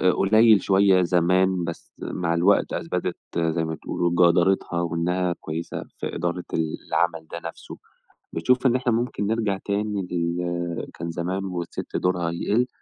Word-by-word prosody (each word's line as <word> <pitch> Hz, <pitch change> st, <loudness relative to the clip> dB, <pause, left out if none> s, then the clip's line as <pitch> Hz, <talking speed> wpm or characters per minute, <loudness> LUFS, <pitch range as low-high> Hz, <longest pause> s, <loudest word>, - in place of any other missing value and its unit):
قليل 110 Hz, +1 st, +5 dB
شوية 95 Hz, -1 st, +4 dB
زمان، 90 Hz, +1 st, +2 dB
بس 85 Hz, 0 st, -7 dB
مع 85 Hz, -2 st, -2 dB
الوقت 90 Hz, +4 st, +3 dB
أثبتت 90 Hz, +1 st, -2 dB, 0.2 s
زَي 80 Hz, 0 st, +1 dB
ما 80 Hz, -, -3 dB
تقولوا 85 Hz, +2 st, -2 dB, 0.2 s
جَدارتها، 85 Hz, -1 st, +1 dB
وإنها 85 Hz, +1 st, 0 dB
كويسة 80 Hz, +2 st, -5 dB
في -, -, -4 dB
إدارة 85 Hz, +1 st, -2 dB
العمل 80 Hz, 0 st, -1 dB
ده 85 Hz, -, -5 dB
نَفْسه، -, -, -11 dB, 0.6 s
بتشوف 125 Hz, +11 st, +1 dB
إن 125 Hz, -, +3 dB
إحنا 125 Hz, -1 st, +1 dB
ممكن 115 Hz, -3 st, -1 dB
نرجَع 110 Hz, -3 st, 0 dB
تاني 100 Hz, -2 st, -1 dB
لل 85 Hz, 0 st, -2 dB
كان 85 Hz, 0 st, -3 dB
زمان، 90 Hz, +3 st, -2 dB
والسِت 90 Hz, -2 st, -4 dB
دُورها 90 Hz, -2 st, 0 dB
يقل، 110 Hz, +8 st, +1 dB
90 Hz, 140 wpm, -24 LUFS, 85-100 Hz, 0.6 s, قليل